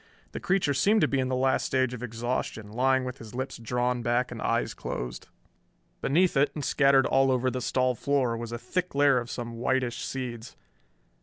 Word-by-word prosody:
The - - -5
creature 185 -7 +1
seemed 200 +11 +3
to - - +4
be 135 - 0
in 130 - 0
the 130 - -1
last 130 +1 +2
stage 130 -2 0
of 125 - -7
exhaustion, 115 -2 -3
lying 130 +3 +2
with 125 0 -6
lips 130 0 -4
drawn 125 +1 -1
back 120 +1 0
and - - -6
eyes - - 0
closed. 60 +1 -6 0.7
Beneath 175 +5 +2
it 140 +2 +4
and 150 - -3
scattered 140 -2 +4
all 135 0 +3
over 130 0 +1
the 130 +1 -3
stall 130 +1 +1
floor 130 -2 0
was 115 0 -6
a 120 - -3
thick 180 +6 -3
layer 140 -2 +4
of 120 0 -7
some 115 -2 -6
whitish 125 -1 0
seeds. 120 -3 -5
130 Hz, 190 wpm, -27 LUFS, 120-135 Hz, 0.7 s, to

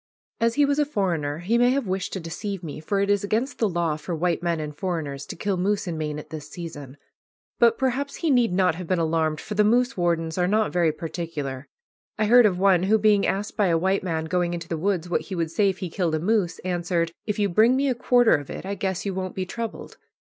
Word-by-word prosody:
As 230 0 +2
he 290 0 +4
was 285 +1 +1
a 295 - +3
foreigner, 170 - -1
he 230 +5 +2
may 245 0 +5
have 265 0 +1
wished 190 +1 -2
to 190 - -3
deceive 185 +3 -5
me, 155 -2 -6
for 195 +6 -1
it 200 0 +2
is 205 -1 +1
against 225 +7 -1
the 220 - +2
law 170 -3 -1
for 155 +3 -4
white 170 0 0
men 170 -2 0
and 150 -1 -5
foreigners 150 -5 -4
to - - -6
kill 195 +2 -1
moose 200 +3 0
in 175 -3 -3
Maine 150 -1 -3
at 150 0 -10
this 150 -2 -7
season. 145 -6 -8 0.6
But 235 -1 +5
perhaps 265 +2 -1
he 325 -3 0
need 245 -6 +3
not 180 -2 +3
have 175 +1 -7
been 185 - +1
alarmed, 160 -1 0
for 215 - -6
the 210 0 +3
moose 245 +4 +2
wardens 170 -1 0
are 180 - +2
not 215 +2 +1
very 170 -3 +3
particular. 155 -4 -5 0.5
I 215 - +1
heard 240 +1 +7
of 185 -3 -1
one 190 -2 +4
who, 205 +4 +3
being 210 -1 +3
asked 200 +2 -2
by 205 -3 +2
a 165 -2 +3
white 190 +3 +1
man 160 -3 -2
going 175 +1 0
into 170 -1 -7
the 165 - -2
woods 180 +1 -1
what 175 - 0
he 195 - -6
would 165 -2 -2
say 200 +3 +3
if 190 - -3
he 185 - -5
killed 170 -4 0
a - - -1
moose, 190 0 +1
answered, 175 -2 -1 0.2
"If 210 - -1
you 205 -1 +2
bring 220 +7 +4
me 275 +1 +1
a 260 - +2
quarter 245 -1 +4
of 145 -2 -1
it - - -7
I 195 - -3
guess 190 -1 -3
you 200 - -1
won't 185 0 -4
be 185 - -2
troubled." 230 +4 -6
185 Hz, 255 wpm, -24 LUFS, 165-210 Hz, 0.6 s, heard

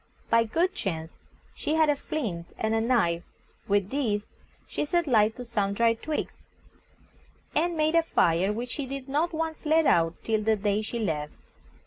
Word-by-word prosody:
By 230 0 +5
good 340 - +1
chance 160 - -4 0.4
she 305 - -2
had 315 -1 +4
a 295 - +3
flint 210 - -4
and 220 0 0
a 225 - +2
knife; 220 -9 +2 0.5
with 200 -1 +1
these 220 -7 -1 0.4
she - - -2
set 345 +3 +1
light 220 -5 +3
to 250 - -7
some 205 -4 0
dry 230 +2 +3
twigs, 300 +7 -4 1.1
and 335 +2 +1
made 310 +1 +2
a 335 - +6
fire, 180 - +2
which 240 +3 -4
she 280 -3 -4
did 275 0 -6
not 300 +5 0
once 320 -1 -3
let 315 +1 +3
out 165 - +3
till 220 -1 +1
the 220 +1 +2
day 205 0 0
she 220 +2 -4
left. 155 -9 -2
230 Hz, 175 wpm, -27 LUFS, 205-300 Hz, 1.1 s, a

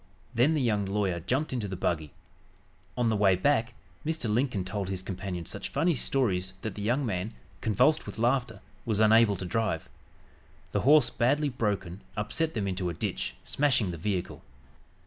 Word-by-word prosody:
Then 130 +7 +3
the 150 - +1
young 105 -4 +1
lawyer 95 -3 0
jumped 130 - -1
into 115 -5 -2
the 95 - -4
buggy. 80 -4 -1 0.9
On 120 -2 +2
the 110 - +2
way 100 -2 +4
back 120 +3 +1 0.3
Mr. 160 -5 -1
Lincoln 110 -3 0
told 95 0 -3
his 95 -1 -3
companion 95 -3 -5
such - - -4
funny 165 +5 +2
stories 95 -9 0
that 110 - -3
the 105 - -7
young 125 +7 +1
man, 100 0 -3 0.3
convulsed 135 +9 +3
with - - -7
laughter, 120 -3 0 0.2
was 110 -3 -1
unable 110 -1 +6
to 95 - -5
drive. 105 -4 -1 0.8
The - - 0
horse, 150 +3 +5
badly 145 +5 +2
broken, 100 -7 -2 0.2
upset 155 +10 -1
them 105 -3 -1
into 90 -1 -1
a 85 - -4
ditch, - - -3
smashing 130 -9 +1
the 85 - -6
vehicle. 90 +1 -3
105 Hz, 170 wpm, -29 LUFS, 95-125 Hz, 0.9 s, unable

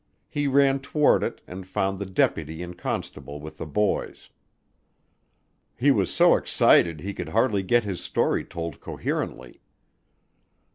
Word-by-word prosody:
He 145 -1 -2
ran 135 0 +3
toward 145 +2 +2
it - - -3
and 95 +1 -9
found 95 0 -1
the 100 - -4
deputy 80 -3 0
and 90 0 -8
constable 75 -3 -5
with 75 +1 -10
the - - -5
boys. 105 +7 -2 1.4
He 140 +4 +3
was 100 -8 +1
so - - +5
excited 85 -3 +3
he 100 +2 -4
could - - -6
hardly 110 -3 +2
get 120 +5 +2
his 95 -4 -4
story - - 0
told 85 -3 -6
coherently. - - -5
95 Hz, 140 wpm, -25 LUFS, 85-120 Hz, 1.4 s, so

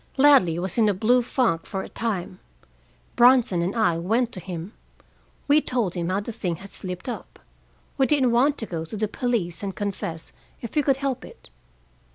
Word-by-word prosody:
"Ladley 265 - +5
was 185 +5 -2
in 215 -2 +5
a 200 - +1
blue 240 +6 +3
funk 235 -9 0
for 190 - -3
a - - -8
time. 195 -5 -4 0.8
Bronson 240 -7 +5
and 180 +5 -1
I 195 -8 +2
went 225 +7 0
to 185 - -5
him. 180 +2 -7 0.7
We 300 +1 +5
told 235 - -1
him 170 -1 -2
how 190 +2 0
the 220 - -6
thing 185 -6 -3
had 195 +4 -12
slipped 180 +2 -6
up. 245 - -6 0.6
We 265 - +4
didn't 270 -5 +3
want 270 +5 +3
to 225 - -4
go 165 -5 -4
to 165 +7 -6
the 215 +1 0
police 215 -7 -2
and 195 -2 -4
confess 185 -5 -4 0.3
if 235 - -7
we 300 - +4
could 275 -2 +2
help 270 -2 -2
it. - - -13
210 Hz, 195 wpm, -24 LUFS, 180-245 Hz, 0.8 s, Ladley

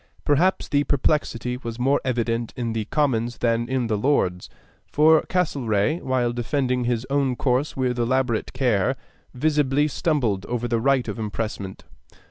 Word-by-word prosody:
Perhaps 170 +6 +2
the 145 0 +2
perplexity 125 -5 0
was 115 -3 -6
more 135 +3 +2
evident 120 -2 -1
in 120 -2 -3
the 110 -1 -2
Commons 120 -3 0
than 115 0 0
in 130 -2 0
the 110 -2 -1
Lords; 95 -9 0 0.4
for 155 +1 +5
Castlereagh, 145 - 0
while 125 -2 0
defending 125 0 -1
his 120 0 -1
own 140 -3 +1
course 130 +3 0
with 125 -2 0
elaborate 120 -1 0
care, 125 -2 +1 0.4
visibly 145 0 +2
stumbled 130 - 0
over 120 0 -2
the 115 -1 0
right 135 0 +2
of - - -5
impressment. 105 -3 -4
125 Hz, 145 wpm, -23 LUFS, 115-140 Hz, 0.4 s, for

